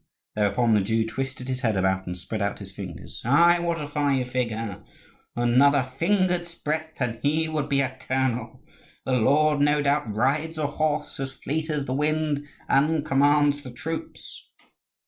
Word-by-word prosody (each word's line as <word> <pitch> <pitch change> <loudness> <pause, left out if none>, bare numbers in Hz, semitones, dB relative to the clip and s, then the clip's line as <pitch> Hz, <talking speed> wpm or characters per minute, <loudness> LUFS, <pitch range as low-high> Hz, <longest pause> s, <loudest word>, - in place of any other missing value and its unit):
Thereupon 110 +3 +2
the 105 -2 +4
Jew 110 +3 +1
twisted 130 +2 -4
his 130 0 -3
head 110 -6 +1
about 95 0 0
and 90 0 -4
spread 105 +4 -4
out 100 0 -1
his 100 -2 -10
fingers. 95 -7 -8
"Ai, 170 +8 +5
what 170 -1 -1
a 150 - -4
fine 145 -3 0
figure! 115 -5 -3 0.5
Another 130 +4 +4
finger's 175 +5 0
breadth 155 +1 -4
and 120 -3 -2
he 155 +3 +1
would 150 -2 -2
be 140 0 +3
a 130 -1 -2
colonel. 125 -3 -1 0.4
The 130 -1 +1
lord 150 +5 +3
no 145 +1 +3
doubt 140 -5 +1
rides 150 +9 0
a 155 - 0
horse 150 0 -1
as 135 -1 -4
fleet 160 +3 -3
as 150 -3 -1
the 130 - -2
wind 150 0 0 0.2
and 150 +2 +2
commands 145 0 +3
the 130 - -9
troops!" 160 +6 -7
140 Hz, 165 wpm, -25 LUFS, 120-155 Hz, 0.5 s, Ai